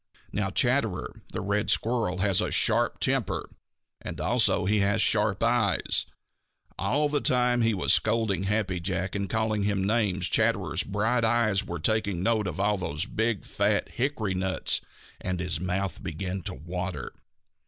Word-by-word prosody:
Now 95 0 -1
Chatterer 115 -3 0
the - - -4
Red 100 +2 -1
Squirrel 110 -6 +1
has 100 -2 +3
a - - -1
sharp - - +3
temper, - - 0 0.5
and - - -6
also - - +2
he 105 +2 +2
has 100 +2 +1
sharp 105 -1 +3
eyes. 115 -5 +1 0.7
All 150 +3 +1
the 145 -1 -1
time 125 -3 +2
he 115 -1 +2
was 95 - +3
scolding 110 -4 +1
Happy 100 -3 -1
Jack 95 +1 -2
and 100 -1 -3
calling 110 -1 0
him 100 -1 0
names 100 -4 +1
Chatterer's 80 +3 +1
bright 110 +4 0
eyes 110 -3 +2
were 90 -4 -5
taking 100 +1 0
note 110 -2 +1
of 90 0 -5
all 105 +1 +1
those 75 -4 -3
big, 110 -1 -2
fat 100 +1 0
hickory 120 -6 -2
nuts 95 0 0 0.4
and 90 -1 -3
his 85 -2 -2
mouth 90 +1 -2
began 90 +4 -4
to - - -4
water. 90 +3 -5
100 Hz, 155 wpm, -27 LUFS, 95-110 Hz, 0.7 s, has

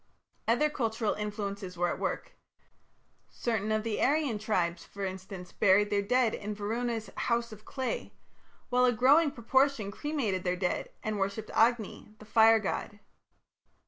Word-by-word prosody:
Other 240 +7 +3
cultural 225 -5 -1
influences 200 -3 -5
were 175 0 +2
at - - -3
work. - - -3 1.0
Certain 220 -3 -2
of 215 0 +1
the 225 -2 -2
Aryan 280 -6 +2
tribes, 180 -5 -1
for 200 0 -6
instance, 185 -1 -7
buried 205 +1 +3
their 200 -1 +2
dead 240 +2 +2
in 210 +1 -4
Varuna's 225 +2 -3
"house 235 -1 0
of 215 0 -12
clay", 260 -2 -3 0.6
while 250 0 +4
a 245 - +3
growing 280 +7 +5
proportion 260 -3 +1
cremated 225 -8 -2
their 180 0 0
dead 180 -1 -1
and 215 -1 -2
worshipped 200 +3 -2
Agni, 225 -2 +1
the 215 - -14
fire 225 +1 +6
god. 210 0 -3
215 Hz, 145 wpm, -30 LUFS, 200-240 Hz, 1.0 s, fire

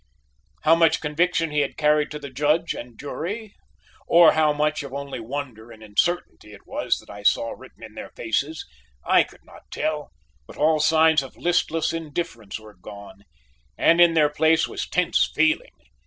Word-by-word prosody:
How 155 - +5
much 165 -1 +4
conviction 165 +1 0
he 150 - 0
had 140 - -1
carried 150 0 +2
to 150 - -6
the 140 -2 -9
Judge 150 +5 +1
and 120 -1 -10
jury, 200 +9 -6 0.5
or 170 -1 +7
how 155 -1 +3
much 150 +1 0
of 140 -2 -8
only 140 -2 -5
wonder 120 -2 -6
and 110 -1 -14
uncertainty 110 0 -2
it 105 - -15
was - - -1
that - - -15
I 100 - -10
saw 115 +3 +2
written - - -13
in - - -11
their - - -8
faces, 140 +8 -2 0.4
I - - +5
could - - -8
not - - -17
tell, 150 -1 -3 0.4
but - - -13
all 155 +1 +3
signs 160 0 +4
of 135 - -11
listless 170 -2 0
indifference 150 - -5
were 110 -1 -14
gone, 100 0 -12 0.5
and 170 +1 +4
in 170 -1 +6
their 150 -2 +4
place 160 +2 +2
was - - -5
tense 180 -1 +1
feeling. 155 0 +1
150 Hz, 175 wpm, -23 LUFS, 130-165 Hz, 0.5 s, or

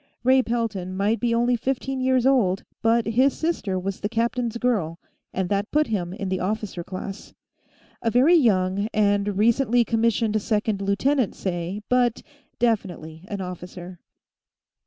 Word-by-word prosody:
Ray 260 +1 +5
Pelton 220 -7 -3
might 210 +4 +1
be 240 -1 0
only 240 +1 +2
fifteen 265 +2 -2
years 255 -1 +2
old, 220 -9 +3 0.2
but 230 +1 +3
his 255 +5 +2
sister 315 - -1
was 190 +1 -4
the 205 - -2
captain's 235 +1 -1
girl, 210 -10 0 0.3
and 190 -1 -2
that 200 +1 0
put 305 +1 +2
him 185 -8 -2
in 195 0 -4
the 185 0 -1
officer 200 -2 -3
class. 190 +3 -8 0.7
A 230 - +1
very 255 +9 +4
young 200 - +3
and 205 -1 +2
recently 235 +2 +3
commissioned 225 -1 +1
second 210 -1 -1
lieutenant, 220 +5 +1
say, 185 +2 -4
but 245 -2 +1 0.3
definitely 185 -8 -2
an 200 -2 -4
officer. 180 0 -8
215 Hz, 145 wpm, -24 LUFS, 190-240 Hz, 0.7 s, Ray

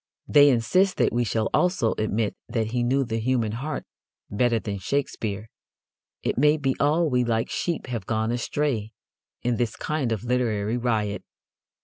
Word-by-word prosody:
They 145 -1 +7
insist 140 +11 +2
that - - +2
we 120 +1 +2
shall 110 0 0
also 180 -11 +2
admit 110 0 0
that 115 -2 -1
he 120 0 0
knew 130 +3 +2
the 115 -2 -2
human 115 -2 0
heart 135 +8 -4 0.5
better 115 +3 +2
than 100 -2 -4
Shakespeare. 110 -3 -2 0.8
It - - 0
may 150 +2 +5
be 135 -3 0
all 155 +4 +3
we 125 -3 +2
like 115 -1 0
sheep 170 -2 -2
have 115 -6 -5
gone 110 0 0
astray 120 -2 -1 0.5
in 120 -1 +1
this 120 -3 -1
kind 150 -6 -2
of 110 -1 -2
literary 115 -3 0
riot. 110 -4 -1
120 Hz, 160 wpm, -25 LUFS, 110-135 Hz, 0.8 s, They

